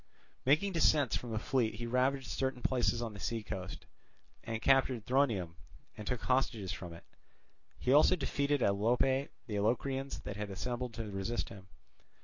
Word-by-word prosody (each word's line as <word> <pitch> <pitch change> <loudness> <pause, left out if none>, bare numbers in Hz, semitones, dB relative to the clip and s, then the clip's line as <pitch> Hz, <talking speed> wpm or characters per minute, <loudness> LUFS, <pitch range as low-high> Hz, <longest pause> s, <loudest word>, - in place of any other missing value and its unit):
Making 155 +9 +4
descents 150 -5 +3
from 120 - -4
the 110 - -2
fleet 115 -1 0
he 120 +2 -5
ravaged 130 +3 +1
certain 130 0 -2
places 120 -2 +1
on 115 -2 -4
the 100 - -9
sea 115 +2 -2
coast, 95 -1 -6 0.6
and 115 -1 -3
captured 130 -3 +3
Thronium 120 -11 +1 0.4
and 105 - -8
took 125 -3 -1
hostages 110 -4 0
from 90 -4 -6
it. 85 - -11 0.7
He 125 - +1
also 150 +5 +6
defeated 145 -4 0
at - - +4
Alope 125 +6 +2 0.2
the 105 -3 -2
Locrians 135 +5 -1
that 100 - -6
had 105 -1 -4
assembled 120 +4 -4
to 110 -3 -5
resist 95 +5 -2
him. 95 -1 -11
120 Hz, 165 wpm, -33 LUFS, 105-135 Hz, 0.7 s, also